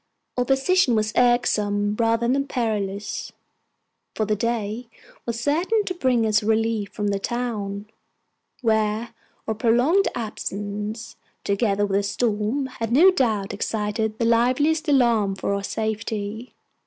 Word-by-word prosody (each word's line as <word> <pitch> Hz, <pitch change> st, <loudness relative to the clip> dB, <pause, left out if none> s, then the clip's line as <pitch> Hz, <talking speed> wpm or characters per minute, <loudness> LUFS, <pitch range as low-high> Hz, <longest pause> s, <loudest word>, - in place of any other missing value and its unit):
Our 250 Hz, -, 0 dB
position 270 Hz, +1 st, +3 dB
was 215 Hz, 0 st, 0 dB
irksome 210 Hz, -4 st, +2 dB
rather 230 Hz, 0 st, +2 dB
than 275 Hz, +3 st, +1 dB
perilous; 210 Hz, -5 st, -3 dB, 0.8 s
for 215 Hz, -, 0 dB
the 210 Hz, 0 st, +1 dB
day 230 Hz, +1 st, -2 dB, 0.4 s
was 230 Hz, -1 st, -2 dB
certain 345 Hz, -, +1 dB
to 365 Hz, -, -2 dB
bring 255 Hz, -9 st, +1 dB
us 215 Hz, 0 st, +3 dB
relief 220 Hz, -1 st, 0 dB
from 205 Hz, -1 st, -2 dB
the 200 Hz, -1 st, 0 dB
town, 210 Hz, -3 st, -3 dB, 0.8 s
where 220 Hz, 0 st, +1 dB, 0.3 s
our 220 Hz, -, 0 dB
prolonged 245 Hz, -, +3 dB
absence, 210 Hz, 0 st, -5 dB, 0.3 s
together 200 Hz, 0 st, +1 dB
with 195 Hz, -1 st, 0 dB
the -, -, +2 dB
storm, 215 Hz, +5 st, -1 dB, 0.2 s
had 225 Hz, 0 st, -1 dB
no 335 Hz, +10 st, +7 dB
doubt 220 Hz, -, 0 dB
excited 215 Hz, +1 st, -2 dB
the 230 Hz, -, 0 dB
liveliest 255 Hz, +8 st, +2 dB
alarm 235 Hz, -8 st, +3 dB
for 200 Hz, -, -2 dB
our 200 Hz, 0 st, -2 dB
safety. 220 Hz, +1 st, -4 dB
225 Hz, 130 wpm, -23 LUFS, 210-245 Hz, 0.8 s, no